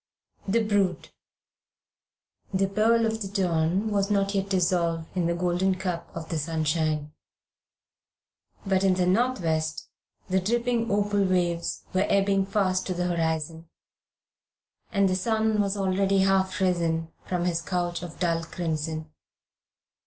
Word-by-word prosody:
THE 225 Hz, +4 st, +2 dB
BRUTE 205 Hz, -4 st, 0 dB, 1.4 s
THE 195 Hz, 0 st, +1 dB
pearl 225 Hz, +3 st, +3 dB
of 220 Hz, 0 st, -2 dB
the 200 Hz, -, -2 dB
dawn 185 Hz, +1 st, 0 dB
was 200 Hz, -1 st, +1 dB
not 200 Hz, -1 st, +1 dB
yet 195 Hz, 0 st, -1 dB
dissolved 170 Hz, -3 st, +1 dB
in 175 Hz, -2 st, +1 dB
the 170 Hz, -, 0 dB
gold 175 Hz, 0 st, -1 dB, 0.2 s
cup 180 Hz, -3 st, -3 dB
of 165 Hz, -1 st, -6 dB
the 165 Hz, -, -1 dB
sunshine, 155 Hz, -1 st, -1 dB, 1.5 s
but 190 Hz, -1 st, +2 dB
in 190 Hz, -1 st, +4 dB
the 180 Hz, -1 st, +1 dB
northwest 175 Hz, -7 st, 0 dB, 0.4 s
the 190 Hz, -1 st, +2 dB
dripping 235 Hz, +3 st, 0 dB
opal 205 Hz, 0 st, +1 dB
waves 175 Hz, -3 st, 0 dB
were 190 Hz, +2 st, +2 dB
ebbing 195 Hz, -1 st, +2 dB
fast 190 Hz, -2 st, 0 dB
to 185 Hz, -, -2 dB
the 180 Hz, 0 st, -1 dB
horizon, 160 Hz, 0 st, -2 dB, 1.2 s
and 200 Hz, 0 st, +3 dB
the 185 Hz, -, +1 dB
sun 220 Hz, +2 st, +1 dB
was 200 Hz, 0 st, -1 dB
already 195 Hz, 0 st, +1 dB
half 190 Hz, 0 st, +2 dB
risen 170 Hz, -3 st, 0 dB, 0.2 s
from 180 Hz, -1 st, -1 dB
his 170 Hz, -2 st, 0 dB
couch 175 Hz, -1 st, -2 dB
of 175 Hz, -2 st, -8 dB
dull 165 Hz, -2 st, +1 dB
crimson. 160 Hz, -2 st, -3 dB
185 Hz, 135 wpm, -26 LUFS, 170-200 Hz, 1.5 s, in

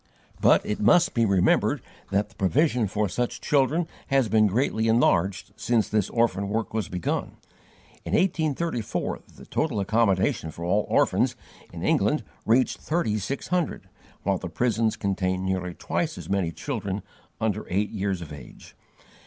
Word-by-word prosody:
But -, -, +5 dB
it 105 Hz, -, -2 dB
must 175 Hz, -, +4 dB
be 115 Hz, -2 st, +2 dB
remembered 95 Hz, -2 st, +3 dB, 0.3 s
that 100 Hz, +1 st, 0 dB
the -, -, -21 dB
provision 120 Hz, -, +2 dB
for 105 Hz, +2 st, 0 dB
such 120 Hz, +4 st, -2 dB
children 150 Hz, +4 st, +2 dB, 0.2 s
has 135 Hz, -4 st, +2 dB
been 110 Hz, -1 st, +4 dB
greatly 110 Hz, +1 st, +1 dB
enlarged 100 Hz, -5 st, +2 dB
since 115 Hz, -3 st, +1 dB
this 105 Hz, -3 st, 0 dB
orphan 100 Hz, -4 st, +1 dB
work 110 Hz, +1 st, -2 dB
was 110 Hz, -5 st, -2 dB
begun. 90 Hz, -1 st, -3 dB, 0.7 s
In -, -, -5 dB
1834 160 Hz, -, 0 dB, 0.2 s
the -, -, -13 dB
total 140 Hz, -10 st, -1 dB
accommodation 100 Hz, -5 st, +1 dB
for 85 Hz, +2 st, -7 dB
all 100 Hz, +4 st, +1 dB
orphans, -, -, +2 dB, 0.4 s
in -, -, -7 dB
England, -, -, +2 dB, 0.2 s
reached 120 Hz, +3 st, +3 dB
thirty 150 Hz, -10 st, 0 dB
six 135 Hz, +8 st, -4 dB
hundred, 180 Hz, -3 st, -1 dB, 0.3 s
while 95 Hz, -1 st, +1 dB
the 90 Hz, -, -5 dB
prisons 115 Hz, +3 st, +1 dB
contained 95 Hz, -3 st, -1 dB
nearly 90 Hz, -2 st, -2 dB
twice 160 Hz, -2 st, -2 dB
as -, -, -8 dB
many 95 Hz, -4 st, 0 dB
children 105 Hz, -, -4 dB, 0.4 s
under 110 Hz, -1 st, -1 dB
eight 100 Hz, +3 st, 0 dB
years 95 Hz, -3 st, -2 dB
of 75 Hz, -, -9 dB
age. 70 Hz, -4 st, -12 dB
105 Hz, 155 wpm, -26 LUFS, 95-125 Hz, 0.7 s, But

